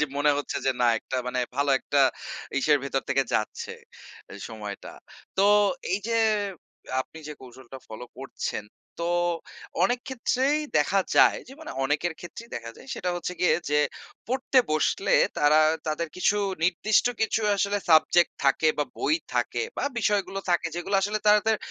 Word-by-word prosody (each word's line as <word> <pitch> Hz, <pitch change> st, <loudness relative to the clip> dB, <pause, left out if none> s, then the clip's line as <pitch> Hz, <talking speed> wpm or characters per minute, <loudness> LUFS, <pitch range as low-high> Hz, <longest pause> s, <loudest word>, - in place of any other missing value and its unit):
যে -, -, +4 dB
মনে 145 Hz, +1 st, +3 dB
হচ্ছে 145 Hz, -, -3 dB
যে, -, -, +4 dB
না, 120 Hz, -, +4 dB
একটা 130 Hz, -, -5 dB
মানে 125 Hz, 0 st, -2 dB, 0.2 s
ভালো 140 Hz, 0 st, +1 dB
একটা 140 Hz, +2 st, 0 dB, 0.6 s
ইসের 145 Hz, +2 st, +3 dB
ভেতর 135 Hz, -1 st, -1 dB
থেকে 135 Hz, 0 st, +2 dB
যাচ্ছে 110 Hz, -, -2 dB, 0.6 s
এ -, -, -8 dB
সময়টা। 105 Hz, -2 st, -7 dB, 0.5 s
তো, 195 Hz, -, +3 dB, 0.5 s
এই 190 Hz, -, +2 dB
যে 230 Hz, -, 0 dB, 0.9 s
আপনি 160 Hz, -, -8 dB
যে -, -, -5 dB
কৌশলটা 130 Hz, 0 st, -12 dB
ফলো 110 Hz, +3 st, -8 dB
করছেন, 135 Hz, -5 st, -4 dB, 0.3 s
তো 170 Hz, -, -2 dB, 0.8 s
অনেক 245 Hz, 0 st, +2 dB
ক্ষেত্রেই 260 Hz, +3 st, +1 dB, 0.2 s
দেখা 155 Hz, +7 st, +3 dB, 0.2 s
যায় -, -, +6 dB
যে, -, -, -11 dB
মানে 315 Hz, -, -7 dB
অনেকের 150 Hz, +5 st, 0 dB
ক্ষেত্রেই 225 Hz, +7 st, -10 dB
দেখা 115 Hz, -1 st, -7 dB
যায় -, -, -14 dB
সেটা 180 Hz, -, -3 dB
হচ্ছে 175 Hz, +1 st, -4 dB
গিয়ে 180 Hz, -, +4 dB, 0.2 s
যে, 150 Hz, -, +3 dB, 0.5 s
পড়তে 260 Hz, +1 st, +2 dB
বসলে 385 Hz, -, +1 dB, 0.3 s
তারা 150 Hz, +1 st, +5 dB, 0.3 s
তাদের 155 Hz, +2 st, -2 dB
কিছু 200 Hz, +3 st, +2 dB, 0.3 s
নির্দিষ্ট 185 Hz, +6 st, +2 dB
কিছু 220 Hz, 0 st, +1 dB, 0.2 s
আসলে 200 Hz, +1 st, +1 dB
সাবজেক্ট 160 Hz, +2 st, +5 dB
থাকে 140 Hz, +3 st, +3 dB
বা 150 Hz, -, +2 dB
বই -, -, +2 dB, 0.2 s
থাকে -, -, 0 dB
বা -, -, -1 dB
বিষয়গুলো 205 Hz, -3 st, 0 dB
থাকে, 175 Hz, -1 st, +2 dB
যেগুলো 185 Hz, +3 st, -3 dB
আসলে 210 Hz, +2 st, 0 dB
তাদের 210 Hz, +1 st, +4 dB
165 Hz, 160 wpm, -26 LUFS, 135-210 Hz, 0.9 s, যায়